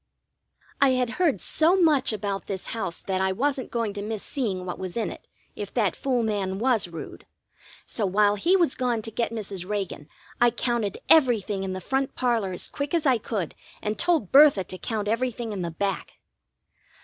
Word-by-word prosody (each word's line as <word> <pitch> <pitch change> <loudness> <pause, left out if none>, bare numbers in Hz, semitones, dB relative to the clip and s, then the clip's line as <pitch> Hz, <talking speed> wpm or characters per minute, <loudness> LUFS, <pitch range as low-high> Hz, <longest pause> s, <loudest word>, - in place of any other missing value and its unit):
I 275 -2 +6
had 250 -2 0
heard 295 - +2
so 325 +4 +3
much 300 -8 +4
about 200 -2 -3
this 190 -2 -4
house 190 -7 -3
that 190 -1 -1
I 190 0 +2
wasn't 265 +5 -1
going 230 -3 -1
to 205 - -5
miss 215 0 -4
seeing 200 -10 -2
what 180 - -5
was 185 +2 -5
in 225 - -1
it, - - -12 0.3
if 205 -1 -6
that 210 -7 +2
fool 255 -3 0
man 200 -3 -1
was 235 -3 +2
rude; 165 -2 -9 0.6
so 210 -4 -1
while 205 +2 +3
he 335 - +2
was 340 -7 +3
gone 245 -3 -1
to 225 - -6
get 230 +2 -1
Mrs. 200 -5 -5
Reagan 195 -7 -3 0.3
I 240 - +7
counted 235 -4 -1
everything 225 -10 +4
in 190 -1 -3
the 185 - -4
front 270 +7 -1
parlor 235 -6 +1
as 180 - -2
quick 285 +3 -3
as 330 - 0
I 255 -4 +4
could, 205 -6 -3 0.3
and 210 +1 -3
told 330 - +2
Bertha 280 -8 +7
to 185 - -7
count 215 -3 -3
everything 230 0 -1
in 195 - -4
the 170 - -2
back. 195 +3 -3
220 Hz, 195 wpm, -26 LUFS, 195-255 Hz, 0.6 s, I